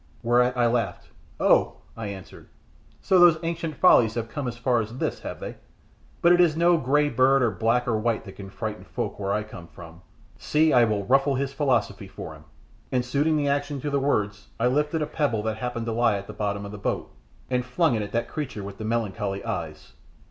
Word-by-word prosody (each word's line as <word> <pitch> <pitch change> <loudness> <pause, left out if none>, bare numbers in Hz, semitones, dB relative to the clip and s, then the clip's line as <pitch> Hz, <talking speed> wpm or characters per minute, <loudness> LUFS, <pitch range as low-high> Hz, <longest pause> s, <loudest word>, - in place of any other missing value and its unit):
Whereat 125 +2 +3
I 120 - +3
laughed. 115 -6 -1 0.3
"Oh!" - - +3 0.2
I 115 -2 -5
answered, 95 -2 -10 0.5
"so 185 - +3
those 175 -2 +7
ancient 165 -2 -3
follies 115 -11 +5
have 115 -1 -3
come 140 +1 -4
as 120 -1 -5
far 120 0 +1
as 110 +3 -7
this, - - -2
have - - -7
they? - - -7 0.7
But 170 - +6
it 175 0 +6
is 160 -3 +3
no 170 +1 +4
bird 155 - -3
grey 145 -1 +1
or 130 -2 +4
black 115 +6 0
or 115 - +1
white 115 0 -1
that 95 - -8
can 95 -1 -9
frighten 110 +1 -5
folk - - -5
where 100 -1 -2
I 105 +1 0
come 90 -5 -11
from; 85 0 -13 0.4
see, 155 +1 +2
I 120 -1 +6
will 105 -3 -1
ruffle 135 +4 +3
his 135 +1 -2
philosophy 115 -8 0
for 85 -4 -8
him," 75 0 -15 0.5
and 125 -1 0
suiting 145 +5 +1
the 145 -1 0
action 145 0 -1
to 145 - -3
the 140 - +1
words 105 -7 -1
I 115 - +1
lifted 150 +5 +1
a - - 0
pebble 145 -8 -1
that 110 0 -2
happened 120 0 -4
to 115 - -2
lie 115 -2 +2
at 100 - -7
the - - -9
bottom 100 -1 -3
of 100 - -7
the 105 - -8
boat - - -3 0.4
and 125 0 +1
flung 130 +4 +1
it 110 - 0
at 100 -1 -5
that 115 +1 -1
creature 130 -9 -5
with 100 0 -9
the - - -5
melancholy 105 -3 -2
eyes. 75 -2 -5
120 Hz, 220 wpm, -25 LUFS, 105-140 Hz, 0.7 s, those